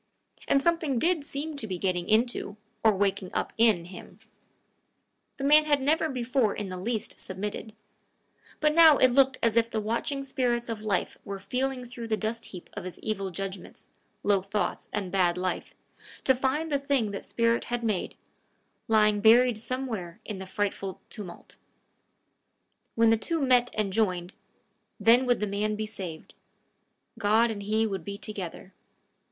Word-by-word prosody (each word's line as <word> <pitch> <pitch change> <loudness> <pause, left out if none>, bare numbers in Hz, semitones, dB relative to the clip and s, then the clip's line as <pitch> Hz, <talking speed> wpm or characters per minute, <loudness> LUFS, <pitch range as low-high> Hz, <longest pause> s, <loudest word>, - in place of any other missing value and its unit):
And 275 0 +3
something 330 -6 +1
did 330 +3 +1
seem 295 +2 -4
to 225 - -3
be 185 -3 -3
getting 180 -1 -1
into, 215 -2 +1 0.3
or 220 -2 +5
waking 195 -1 0
up - - -1
in, 215 -7 +4
him. 180 0 -11 1.2
The 275 - -5
man 300 +2 +6
had 290 -2 +3
never 315 +4 +1
before 250 -3 0
in 205 -2 -4
the 185 - -5
least 220 +3 -3
submitted; 210 +3 -5 0.8
but 300 0 +3
now 320 -3 +8
it 255 - +5
looked 265 +1 +4
as 230 -1 +3
if 230 0 +3
the 220 - -2
watching 235 +6 -2
spirit 245 -3 -1
of 225 -2 -4
life 210 -4 -1
were 200 0 -5
feeling 250 +6 -2
through 240 -1 -7
the 220 -1 0
dust 225 +2 -3
heap 180 -3 -10
of 205 - -6
his 185 -1 -7
evil 195 -3 -2
judgments, 190 0 -7 0.3
low 200 -2 +3
thoughts, 200 +2 -3
and 195 -4 -3
bad 180 -2 +2
life, 185 0 -3 0.5
to 265 - +5
find 270 +5 -1
the 285 - +2
thing 275 -6 0
that 200 - -5
spirit 230 0 +1
had 240 0 -3
made, 215 -5 -1 0.7
lying 215 -2 +3
buried 240 +2 +6
somewhere 225 -7 -4
in 210 -3 -5
the 190 - -7
frightful 195 -1 -3
tumulus: 200 -6 -9 1.4
when 230 0 +5
the 225 - +4
two 330 +9 -1
met 250 -3 +4
and 205 -3 -1
joined, 185 -4 0 0.7
then 245 +3 +5
would 245 -1 +3
the 210 - 0
man 210 +1 -1
be 215 +1 -3
saved; 180 -7 -7 0.9
God 220 +3 +3
and 205 -2 -5
he 215 +2 +1
would 195 -5 -3
be 200 +2 -6
together. 195 -3 -7
220 Hz, 165 wpm, -28 LUFS, 195-255 Hz, 1.4 s, now